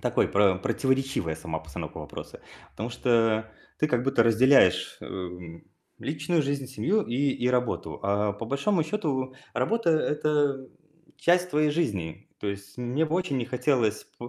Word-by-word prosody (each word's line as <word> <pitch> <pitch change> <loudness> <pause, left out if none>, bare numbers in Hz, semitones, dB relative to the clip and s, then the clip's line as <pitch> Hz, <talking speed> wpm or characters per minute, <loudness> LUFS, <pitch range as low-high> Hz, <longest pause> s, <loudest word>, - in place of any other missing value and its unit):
такой - - +1
про 100 -2 +4
противоречивая 130 - 0
сама 80 0 -5
постановка 80 -2 -8
вопроса. - - -8 0.3
Потому 110 +4 -5
что 115 -3 +2 0.3
ты 155 - +2
как 125 -2 +1
будто 135 -3 +3
разделяешь, 115 -2 +4
э, - - -9
м, 90 -2 -8 0.3
личную 155 +3 0
жизнь, 140 -1 -2
семью 195 +10 +1
и 120 - -4
и 125 -1 0
работу. 125 -1 -1
А 100 +1 +1
по 105 +3 -7
большому 155 - +1
счёту 140 -9 -2 0.2
работа- 230 -6 +1
это 150 -3 +1 0.5
часть 175 +4 +2
твоей 150 -1 +2
жизни. 100 - -2
То - - -5
есть 100 +2 -6
мне 125 +6 0
бы 160 +3 0
очень 140 -7 -1
не 120 - -2
хотелось 125 -4 +1
п 120 - -7
130 Hz, 155 wpm, -27 LUFS, 105-150 Hz, 0.5 s, про